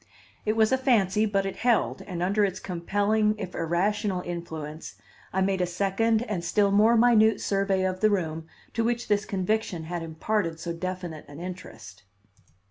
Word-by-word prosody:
It 215 - +3
was 220 +1 +4
a 260 - +3
fancy, 220 -5 +3
but 195 -1 0
it 195 - -4
held, 240 -2 +1
and 175 -3 -4
under 200 +3 +2
its 190 -2 -1
compelling 205 +4 0
if 190 -4 -6
irrational 185 +3 0
influence, 160 -3 -6 0.4
I 190 - 0
made 190 -1 +1
a 180 - +1
second 200 +5 +1
and 210 -8 -3
still 200 +3 +2
more 220 +4 +5
minute 220 -2 +5
survey 195 -1 0
of 185 0 -1
the 215 - +4
room 160 -5 -2 0.3
to 230 - 0
which 235 0 -1
this 205 0 +2
conviction 195 -3 -1
had 170 +1 -4
imparted 165 +1 -2
so 170 0 -4
definite 175 -2 -5
an 145 +1 -11
interest. 175 - -9
195 Hz, 170 wpm, -26 LUFS, 175-215 Hz, 0.4 s, more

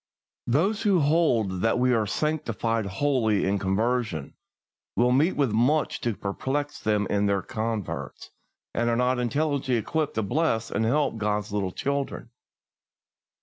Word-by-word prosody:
Those 190 - +1
who 200 -5 +3
hold 125 - +2
that 115 +3 +2
we 125 0 +3
are 110 -3 +1
sanctified 115 -6 -1
wholly 110 -1 +1
in 100 +1 +1
conversion 100 - -1 0.6
will 125 +1 +3
meet 150 +8 +3
with 140 -6 +1
much 130 +8 +1
to 115 -3 -1
perplex 135 +10 -3
them 105 -1 +1
in 100 0 +2
their 100 -2 +1
converts, 110 -2 -4 0.4
and 120 0 0
are 115 - +2
not 125 +1 +1
intelligently 135 +1 0
equipped 150 +7 -1
to 110 - 0
bless 115 -1 0
and 110 +2 0
help 140 0 +1
God's 105 -1 -1
little 100 -3 -1
children. 140 +6 -3
120 Hz, 145 wpm, -26 LUFS, 105-145 Hz, 0.6 s, who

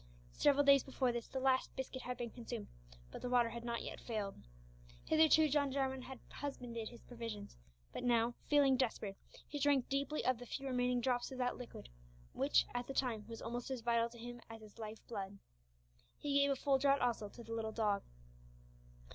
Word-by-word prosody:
Several 285 0 +4
days 275 -1 +8
before 260 -1 0
this 235 -1 -3
the 265 - -3
last 260 0 +2
biscuit 260 -1 -4
had 250 0 -4
been 240 -2 -4
consumed 235 -3 -5 0.5
but - - -7
the 250 - -2
water 245 -2 +4
had 235 +1 -6
not 235 -1 -2
yet - - -6
failed. 210 -4 -2 0.7
Hitherto 315 0 +6
John 285 -1 +2
Jarwin 265 -1 0
had 260 0 -8
husbanded 240 -6 -4
his 235 - -13
provisions, 230 -4 -6 0.4
but - - -4
now, 235 -1 +3
feeling 280 -3 +5
desperate, 220 -6 -1 0.3
he 295 - -4
drank 280 -2 +3
deeply 280 +2 0
of 255 -2 +2
the 245 - -8
few 275 - -4
remaining 250 -1 +1
drops 245 +1 0
of 260 - -6
that 250 -1 0
liquid 250 - -8 0.5
which, - - +4
at 245 0 -2
the 275 - -5
time, 225 -5 0
was 230 -1 -7
almost 240 +2 -3
as 260 -3 -3
vital 235 0 +2
to 235 - -13
him 240 +1 -7
as 225 0 -9
his 210 0 -14
life 220 0 -7
blood. 200 -3 -5 0.8
He 290 -1 -2
gave 280 0 +4
a 275 - +3
full 270 0 +2
draught 275 0 +4
also 230 -4 0
to 235 - -11
the 230 0 -6
little 220 -1 -2
dog. 210 -3 +1
245 Hz, 195 wpm, -37 LUFS, 230-270 Hz, 0.8 s, days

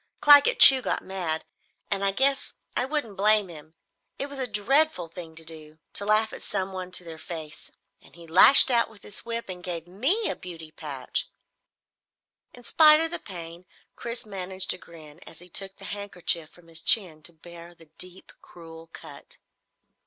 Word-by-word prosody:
Claggett 290 -1 +6
Chew 265 -1 +9
got - - -4
mad, 175 -4 -4 0.5
and 200 -1 -3
I 195 - 0
guess 270 +6 -2 0.2
I 250 - +2
wouldn't 270 -7 -4
blame 210 -1 +4
him. 155 -1 -14 0.4
It 280 - -6
was 280 -1 -9
a 260 - -1
dreadful 235 - +2
thing 165 -1 -12
to 165 0 -8
do 155 -1 -10 0.2
to 200 - +1
laugh 215 +1 +2
at - - -10
someone 190 -2 -5
to 180 - +3
their 165 -2 -12
face 160 -5 -10 0.3
and - - -21
he 170 -1 -14
lashed 185 +12 +8
out 235 -1 +1
with 220 -2 -19
his 205 - -8
whip 230 0 -6
and 180 -2 -9
gave 170 -3 -6
me 270 - -1
a - - -4
beauty 165 -3 -12
patch!" 140 -5 -6 1.2
In 245 - -16
spite 305 +4 +4
of 325 0 0
the 345 - -2
pain 170 -2 -9 0.3
Chris 235 0 -7
managed 190 -2 -4
a 180 - -11
grin 160 -3 -16
as - - -14
he 180 +2 -13
took 195 +2 -7
the 195 - -12
handkerchief 180 -5 -2
from 175 0 -22
his 165 -1 -5
chin 175 -8 +2
to 170 - -7
bare 170 +1 -15
the 165 - -20
deep, 185 +1 -11
cruel 165 -1 -15
cut. - - -12
185 Hz, 180 wpm, -24 LUFS, 165-225 Hz, 1.2 s, Chew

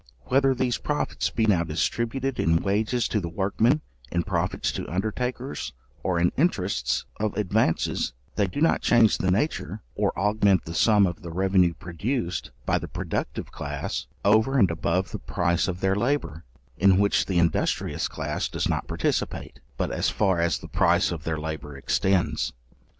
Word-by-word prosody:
Whether 135 0 +3
these 125 -1 0
profits 150 0 -1
be 110 - 0
now 95 -6 +3
distributed 120 - -1
in 80 +1 +2
wages 110 +5 +1
to 105 - +1
the 85 -4 -4
workmen, 105 - +1 0.3
in 85 0 0
profits 90 -1 -1
to - - -5
undertakers, 125 - -3 0.3
or 90 -2 0
in 85 +1 +3
interests 100 - 0
of 110 0 -1
advances, 105 - +1 0.2
they 100 - +2
do 140 +10 -4
not 165 - +3
change 115 -3 +4
the 95 - +1
nature, 110 +12 -1
or - - +1
augment 100 -2 +2
the 80 - -6
sum 105 +3 +4
of 90 +4 -3
the 85 - -7
revenue 90 0 +2
produced 90 - -3 0.2
by - - +2
the - - -6
productive - - -4
class - - -4 0.2
over 110 +6 +4
and 95 -8 +4
above 85 +3 -1
the - - -5
price 85 +1 0
of 90 -1 -4
their 95 0 +2
labour, 120 - -1 0.3
in 95 0 +5
which 100 +1 +2
the 95 - 0
industrious 85 -1 +1
class - - -3
does - - -1
not - - -1
participate, - - -2 0.2
but - - -1
as - - 0
far 95 -4 +1
as 85 0 +2
the - - -10
price - - +2
of 80 -3 -5
their 80 -1 -1
labour 75 -2 -5
extends. 95 +6 +1
95 Hz, 165 wpm, -26 LUFS, 85-115 Hz, 0.3 s, in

